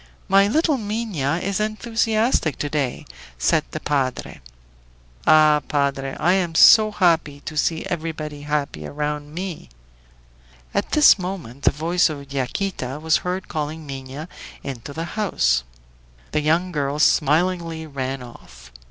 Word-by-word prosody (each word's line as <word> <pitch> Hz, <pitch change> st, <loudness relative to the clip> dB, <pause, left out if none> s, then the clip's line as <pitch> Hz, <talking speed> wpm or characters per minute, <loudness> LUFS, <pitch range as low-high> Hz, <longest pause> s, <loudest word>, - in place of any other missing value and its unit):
"My 195 Hz, +1 st, +5 dB
little 300 Hz, +4 st, +2 dB
Minha 205 Hz, -9 st, -2 dB
is 195 Hz, 0 st, -1 dB
enthusiastic 220 Hz, -, 0 dB
to 145 Hz, -, -3 dB
day," 140 Hz, -5 st, -2 dB, 0.3 s
said -, -, +2 dB
the -, -, -5 dB
padre. 135 Hz, -3 st, -2 dB, 0.9 s
"Ah, 155 Hz, -1 st, +6 dB
padre! 140 Hz, -2 st, -1 dB
I 175 Hz, -, +3 dB
am 175 Hz, -4 st, 0 dB
so 215 Hz, +5 st, +8 dB
happy 165 Hz, -8 st, +1 dB
to 155 Hz, -, -7 dB
see 160 Hz, +2 st, 0 dB
everybody 155 Hz, -3 st, -4 dB
happy 145 Hz, -, -3 dB
around 150 Hz, 0 st, -4 dB
me!" 175 Hz, -, -6 dB, 1.0 s
At -, -, -2 dB
this 300 Hz, -8 st, +7 dB
moment 175 Hz, -9 st, -6 dB
the -, -, +6 dB
voice 170 Hz, +4 st, +1 dB
of 140 Hz, -2 st, -8 dB
Yaquita 135 Hz, 0 st, -3 dB
was 160 Hz, 0 st, +2 dB
heard 180 Hz, +1 st, -4 dB
calling 155 Hz, 0 st, -4 dB
Minha 135 Hz, +2 st, -7 dB, 0.4 s
into 135 Hz, -1 st, -6 dB
the 165 Hz, +3 st, -4 dB
house. 65 Hz, -, 0 dB, 0.7 s
The 150 Hz, -, 0 dB
young 165 Hz, +4 st, +1 dB
girl 145 Hz, -2 st, -1 dB
smilingly 165 Hz, +2 st, +2 dB
ran 135 Hz, -3 st, -4 dB
off. 65 Hz, -, -14 dB
155 Hz, 135 wpm, -22 LUFS, 140-185 Hz, 1.0 s, so